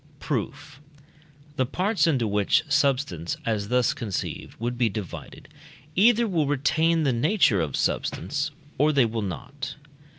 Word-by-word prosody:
Proof. 145 +2 -4 0.8
The 130 - +2
parts 195 - +1
into 130 -8 +2
which 105 +9 +2
substance 140 - 0
as 105 -3 -1
thus 125 +1 +2
conceived 105 -6 -5
would 120 +2 -2
be 120 -2 +2
divided 100 -2 -7 0.5
either 235 +4 +5
will 165 -7 +1
retain 160 +4 +2
the 135 -3 +2
nature 120 - +3
of 75 -4 -2
substance, 145 - -1 0.3
or 150 +2 +4
they 140 -4 +4
will 115 0 -2
not. 135 +8 -6
135 Hz, 135 wpm, -25 LUFS, 110-155 Hz, 0.8 s, either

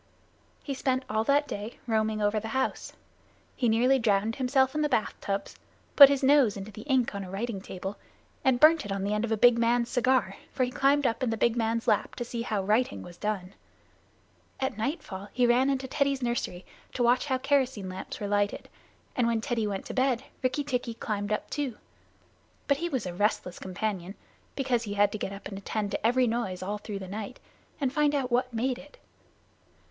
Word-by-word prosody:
He 280 - -3
spent 260 -1 -1
all 220 +1 +1
that 290 +2 +3
day 210 +3 -6
roaming 220 -2 0
over 205 +1 +2
the 220 - -6
house. 265 - -2 0.6
He 245 - +1
nearly 250 +4 +4
drowned 215 -1 +1
himself 265 0 +2
in 305 - 0
the 300 - +1
bath 220 - +1
tubs, 200 0 -3 0.4
put 280 -2 +11
his 280 -1 0
nose 265 -7 +5
into 200 +2 -7
the 210 - -9
ink 255 -4 +2
on 200 0 -4
a 185 - -8
writing 200 +1 -3
table, 190 +1 -6 0.5
and 260 -3 +3
burned 310 +1 +6
it 205 - -6
on 195 -1 -2
the 205 +1 0
end 210 +2 0
of - - -6
the 220 - +1
big 240 +2 +6
man's 235 +1 +2
cigar, 250 -6 +2
for 255 - 0
he 250 - -1
climbed 280 +2 +2
up 230 -2 0
in 255 - +1
the 225 - -1
big 235 +1 +2
man's 230 0 -1
lap 210 - +1
to 240 - -4
see 235 0 -4
how 215 -4 -1
writing 210 - +1
was 175 - -11
done. 195 -2 -3 1.1
At 265 - -1
nightfall 210 - -4
he 250 0 +3
ran 245 +3 +4
into 270 -1 -1
Teddy's 275 -1 0
nursery 235 -7 -2 0.3
to 245 - +1
watch 245 +4 +3
how 260 -2 +1
kerosene 260 -7 0
lamps 185 +1 -7
were 205 - -3
lighted, 205 0 0 0.5
and 245 -2 +2
when 230 -1 +1
Teddy 230 -2 -1
went 195 -2 -4
to - - -6
bed 260 -1 +1 0.2
Rikki 265 +3 0
tikki 250 -4 -2
climbed 205 -2 -3
up 210 - -1
too. 280 -7 -2 0.9
But 280 - +3
he 345 +3 -2
was 260 - -2
a 180 - -4
restless 185 -1 -1
companion, 190 0 -4 0.4
because 255 -4 0
he 205 -3 -5
had 205 0 +4
to 215 - -5
get 195 - -3
up 200 0 -8
and 195 -1 -7
attend 205 +1 -3
to - - -3
every 250 +3 +3
noise 220 -6 -2
all 205 +2 -3
through 205 -1 -6
the 190 -1 -7
night, 210 +5 -6 0.4
and 270 -3 0
find 295 -1 +2
out 260 -3 -1
what 255 +1 +1
made 245 +2 -1
it. 290 +1 -15
235 Hz, 210 wpm, -28 LUFS, 205-260 Hz, 1.1 s, put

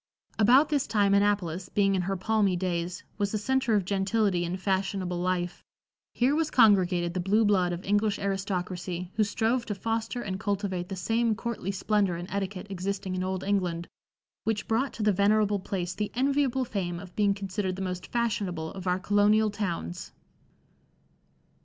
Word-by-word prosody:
About 255 +7 +6
this 285 -3 +1
time 205 -2 +2
Annapolis, 195 -3 +1
being 195 -1 +2
in 190 - +1
her 195 +2 -2
palmy 205 -1 +2
days, 175 -1 -2 0.2
was 200 -1 0
the 215 - 0
center 260 +1 +1
of 200 -3 +1
gentility 195 -1 +1
and 180 +2 -3
fashionable 190 -2 -1
life; 180 -1 -2 0.5
here 250 +4 +3
was 315 0 +1
congregated 185 -7 +4
the 185 - -2
blue 205 +5 +3
blood 185 -4 +3
of 175 +2 -5
English 205 +1 +2
aristocracy, 185 -2 -3
who 215 - +2
strove 225 +4 0
to 210 - -2
foster 225 +4 -2
and 190 -2 -4
cultivate 195 -3 -2
the 195 - -4
same 225 +4 +1
courtly 230 -4 -4
splendor 200 -1 +1
and 175 +1 -6
etiquette 195 -1 -3
existing 190 0 -3
in 185 0 -1
old 185 0 -2
England, 180 -4 -1 0.6
which 220 -1 -1
brought 250 +5 +1
to 220 - -4
the 210 -1 +4
venerable 205 +1 +3
place 185 -2 -3
the 210 -1 -3
enviable 265 0 +1
fame 175 -6 -3
of 185 -2 -11
being 200 -2 +2
considered 195 -1 -3
the 195 - -6
most 180 -1 -4
fashionable 200 -9 -1
of 190 -1 -7
our 180 0 +2
colonial 205 +2 +3
towns. 175 - -4
200 Hz, 170 wpm, -28 LUFS, 185-215 Hz, 0.6 s, About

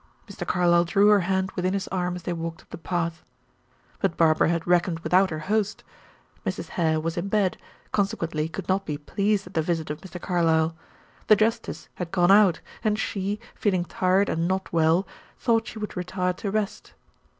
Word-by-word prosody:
Mr. - - -7
Carlyle 175 -1 +4
drew 200 +4 +4
her 210 -1 +6
hand 190 +1 0
within 185 0 -1
his 195 - -2
arm 180 -1 -1
as 180 - -8
they 175 - -2
walked 165 0 -5
up - - -33
the - - -6
path. 170 0 -2 0.8
But 165 - 0
Barbara 160 -1 +4
had 170 -1 -1
reckoned 175 -1 +2
without 185 +2 +3
her 155 - -4
host. 215 +1 0 0.6
Mrs. - - -4
Hare 160 -2 +1
was 165 +2 -3
in 175 +3 -2
bed, 200 -2 +1 0.4
consequently 165 -7 -1
could 170 +3 -6
not 190 +1 +1
be 150 -5 -4
pleased 200 +7 0
at 180 - -12
the 160 - +2
visit 160 -1 -2
of 150 - -6
Mr. 185 -1 -8
Carlyle. 165 -3 +1 0.5
The 215 - +8
justice 225 +2 -1
had 180 -2 -5
gone 175 0 +3
out, 200 -4 +5 0.2
and 215 -2 +1
she, 205 -1 -2
feeling 185 -4 0
tired 190 0 +2
and 165 +1 0
not 190 0 -2
well, 165 +3 +3 0.3
thought 225 -2 +1
she 230 - -8
would 210 -1 -5
retire 180 0 -1
to 200 +3 -4
rest. 210 0 -3
180 Hz, 190 wpm, -25 LUFS, 165-200 Hz, 0.8 s, The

